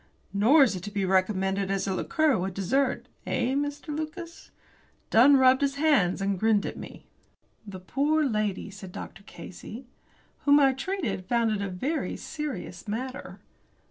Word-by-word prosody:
"Nor 240 +10 +6
is 230 -7 +1
it 180 - -6
to 205 - -6
be 200 -2 -1
recommended 190 +1 +1
as 195 -1 -1
a 195 - -1
liqueur 305 +8 +1
with 190 -1 -3
dessert 260 +8 0 0.2
eh, 250 +1 0
Mr. 290 +2 -3
Lucas?" 335 +2 -7 0.6
Dunn 270 +5 +7
rubbed 260 0 +5
his 280 -1 +1
hands, 280 - +2
and 195 -1 -1
grinned 215 -1 +2
at - - -4
me. - - -10 0.6
"The 190 -2 -8
poor 290 +10 +1
lady," 215 -5 -2
said 190 -2 -10
Dr. 175 - -9
Casey, 200 +7 -10 0.5
"whom 285 0 +5
I 270 -2 +4
treated 255 - -3
found 235 -2 +1
it 210 -2 -1
a 200 - -2
very 265 - -2
serious 300 -6 -6
matter." 255 +5 -5
230 Hz, 160 wpm, -27 LUFS, 195-285 Hz, 0.6 s, Dunn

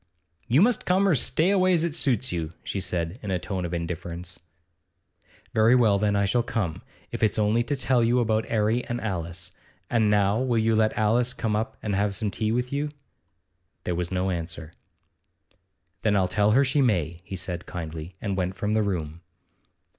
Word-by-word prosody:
'You 130 +9 +5
must 240 0 +1
come 190 +2 +3
or 185 - +4
stay 160 +6 +2
away, 185 -2 +3
as 165 -2 +2
it 170 -3 -1
suits 130 - 0
you,' 85 -2 -3
she 100 - -3
said, 90 +2 -3
in 105 - -6
a 95 - +1
tone 95 0 -4
of 85 - -4
indifference. 85 +1 -5 1.1
'Very 110 +3 +5
well, 110 -5 +4
then 105 0 +1
I 100 0 +2
shall 120 +5 +2
come, 110 -8 -3 0.3
if - - -5
it's 110 -1 +2
only 110 +2 +2
to 145 +4 -1
tell 130 -2 +2
you 120 +2 +3
about 110 -2 +1
'Arry 110 +2 +1
and 120 0 -3
Alice. 85 -5 -4 0.4
And 110 -3 +3
now 105 +2 +3
will 125 -3 +1
you 110 0 +2
let 110 0 +2
Alice 115 +3 +2
come 110 -3 -1
up 110 +1 -2
and 105 - -1
have 100 0 +1
some 105 +1 -2
tea 110 +1 -1
with 125 +3 -1
you?' 145 +1 -1 0.9
There 90 - -1
was 85 +1 -3
no 95 +1 0
answer. 85 -2 -5 1.3
'Then 105 -2 +2
I'll 95 -2 +3
tell 105 +2 +2
her 140 +4 +5
she 135 +3 +2
may,' 85 - +1
he 95 - -7
said 90 -1 -4
kindly, 80 0 -6
and 100 -3 -2
went 95 0 -2
from 105 +1 -1
the 110 - +3
room. 85 -5 -3
105 Hz, 195 wpm, -26 LUFS, 90-120 Hz, 1.3 s, You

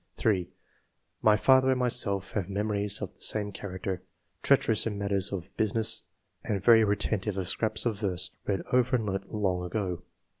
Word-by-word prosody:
3. 95 -5 0 0.7
''My 105 -1 +5
father 130 0 +5
and 130 -1 +2
myself 115 -6 +1
have 100 -3 -3
memories 105 0 -1
of 95 - -6
the - - -21
same 105 -1 0
character; 95 -1 -5 0.4
treacherous 110 0 +3
in 105 -2 -3
matters 100 -1 -1
of 95 -1 -6
business 110 +1 +2 0.4
and 100 - -1
very 110 +3 +6
retentive 105 -1 -1
of 95 -2 -2
scraps 110 +4 -1
of 110 -4 -1
verse 95 -2 -1 0.2
read 95 -3 -1
over 125 0 +3
and 115 -3 0
learnt 95 -1 -4
long 95 -4 -1
ago. 90 -1 -3
100 Hz, 165 wpm, -28 LUFS, 95-110 Hz, 0.7 s, very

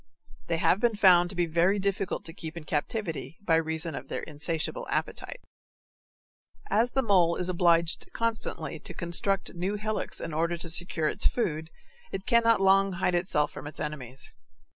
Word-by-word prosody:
They 165 - 0
have 180 - +3
been 235 -1 +2
found 180 -4 +6
to 190 - -6
be 175 -1 +2
very 170 +5 +2
difficult 195 -1 -2
to 165 - -3
keep 160 -1 -7
in 165 - -6
captivity 165 +2 -3
by 165 -3 +4
reason 160 0 -2
of - - -6
their - - -4
insatiable 160 - -3
appetite. - - -2 1.3
As 235 +3 +2
the 265 - +2
mole 180 -6 +4
is 180 - -1
obliged 170 -2 +2
constantly 230 -1 -3
to - - -8
construct 190 +3 0
new 185 +3 -2
hillocks 215 +1 -2
in 165 - -5
order 170 +2 0
to 170 0 -3
secure 160 -1 +3
its - - +2
food, 160 -9 -2 0.4
it 190 - -5
cannot 230 -1 +4
long 195 0 +4
hide 180 0 0
itself 175 -4 +1
from - - -8
its 150 - -4
enemies. 135 -4 -4
175 Hz, 170 wpm, -28 LUFS, 160-195 Hz, 1.3 s, found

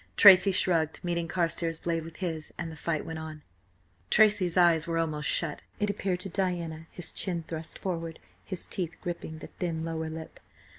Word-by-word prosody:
Tracy 195 -1 +9
shrugged, 165 -4 +2
meeting 170 -1 -1
Carstares' 165 -1 0
blade 165 -1 -1
with 165 0 -10
his, 160 -4 -3
and 170 -2 -4
the - - -8
fight 160 0 -2
went 160 -1 -5
on. 155 -1 -8 0.7
Tracy's 205 -5 +4
eyes 170 -3 +5
were 165 -1 0
almost 155 -2 -1
shut, 160 -4 0 0.2
it 210 0 +1
appeared 190 -3 -2
to 195 - -4
Diana, 170 -4 -2
his 175 -2 -4
chin 175 -4 0
thrust 160 -1 -4
forward, 165 -3 -3 0.3
his 185 -3 -3
teeth 170 -3 -2
gripping 170 -2 -5
the - - -9
thin 165 -3 -2
lower 160 -1 -3
lip. 160 0 -8
165 Hz, 180 wpm, -29 LUFS, 160-180 Hz, 0.7 s, Tracy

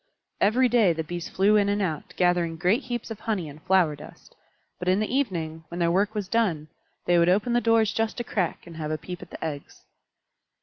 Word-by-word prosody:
Every 245 +5 +4
day 225 -7 +4
the 160 0 -3
Bees 175 +2 -6
flew 200 +3 +3
in 200 -1 +2
and 205 0 +1
out, 160 -7 -3
gathering 175 -2 +2
great 185 - +2
heaps 240 -2 -4
of 220 - -6
honey 205 -8 -2
and 150 +1 -11
flower 180 -4 +3
dust; 150 +1 -14 0.4
but 180 - -5
in 185 +2 +3
the 215 +3 -2
evening, 165 - -2
when 170 - -8
their 170 -1 +2
work 200 +4 +1
was 205 -3 -2
done, 185 -9 0 0.4
they 175 -1 +4
would 170 +1 +4
open 210 +6 +2
the 240 - +3
doors 225 -2 +3
just 225 +2 -1
a - - -1
crack 190 -6 -2
and 170 -2 -11
have 155 -1 -4
a 155 - -1
peep 175 +3 -8
at - - -11
the - - -6
eggs. 145 -3 -7
185 Hz, 225 wpm, -26 LUFS, 165-215 Hz, 0.4 s, Every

